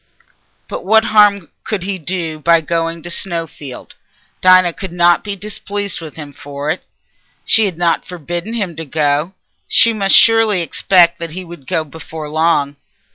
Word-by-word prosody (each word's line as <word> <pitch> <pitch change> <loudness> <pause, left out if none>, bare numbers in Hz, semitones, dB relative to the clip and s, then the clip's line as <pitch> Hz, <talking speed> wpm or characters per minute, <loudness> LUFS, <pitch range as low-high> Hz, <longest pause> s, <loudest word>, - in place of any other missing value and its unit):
But - - -6
what 220 0 +3
harm 200 -5 +4
could 210 -5 -3
he 190 0 -3
do 165 -2 -3
by 165 +2 +4
going 165 0 -2
to 175 - -6
Snowfield? 165 -7 -4 0.5
Dinah 185 -1 +5
could 190 0 -7
not 175 0 +3
be 205 -1 -4
displeased 205 -1 -5
with 160 -2 -9
him 145 -3 -9
for 145 +1 -5
it. - - -5 0.6
She 220 -1 +3
had 185 -5 -3
not 170 -1 +1
forbidden 175 +4 -5
him 200 -8 -3
to 165 - -5
go. 150 +3 0 0.3
She 230 -2 +4
must 195 -3 +3
surely 225 -5 +5
expect 170 +1 +3
that 165 -2 -6
he 185 +2 -5
would 170 -6 -12
go 165 -3 0
before 155 0 -9
long. 155 -3 +1
170 Hz, 165 wpm, -16 LUFS, 160-195 Hz, 0.6 s, Dinah